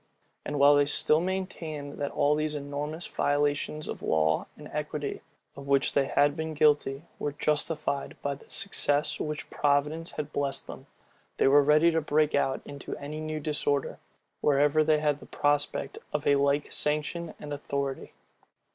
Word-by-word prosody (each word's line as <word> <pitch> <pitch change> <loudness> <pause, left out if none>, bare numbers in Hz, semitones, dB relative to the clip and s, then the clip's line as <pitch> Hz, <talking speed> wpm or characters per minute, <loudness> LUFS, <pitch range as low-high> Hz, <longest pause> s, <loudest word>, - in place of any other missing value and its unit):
And 145 - -3
while 140 +1 +7
they 145 0 +3
still 155 +2 +2
maintained, 165 -6 -4
that 145 -1 -1
all 145 +1 +2
those 155 0 -1
enormous 145 +3 -4
violations 145 +1 0
of - - -5
law 80 0 +1
and - - -10
equity, - - -4 0.3
of 140 0 -10
which 140 -1 +2
they 140 -1 +2
had 145 +1 +3
been 160 -1 -4
guilty, 145 -1 +2 0.2
were 145 - -2
justified 150 -1 -1
by 140 - 0
the 140 - -14
success 145 -7 0
with - - -2
which 150 - -5
providence 150 +3 +1
had 150 0 -5
blessed 140 -1 -2
them; - - -10 0.5
they - - +4
were 145 +2 +7
ready 150 +4 +5
to 160 0 +1
break 150 0 +2
out 135 -2 +1
into 140 -1 -7
any 150 +2 -6
new 155 0 -3
disorder, 145 -2 -1 0.4
wherever 145 +2 +3
they 155 0 +3
had 150 -1 +1
the - - -13
prospect 145 -1 0
of 150 -1 -1
a 145 - +5
like 140 +1 +1
sanction 150 +3 -1
and 145 -1 -6
authority. 140 -1 -4
145 Hz, 165 wpm, -28 LUFS, 140-155 Hz, 0.5 s, while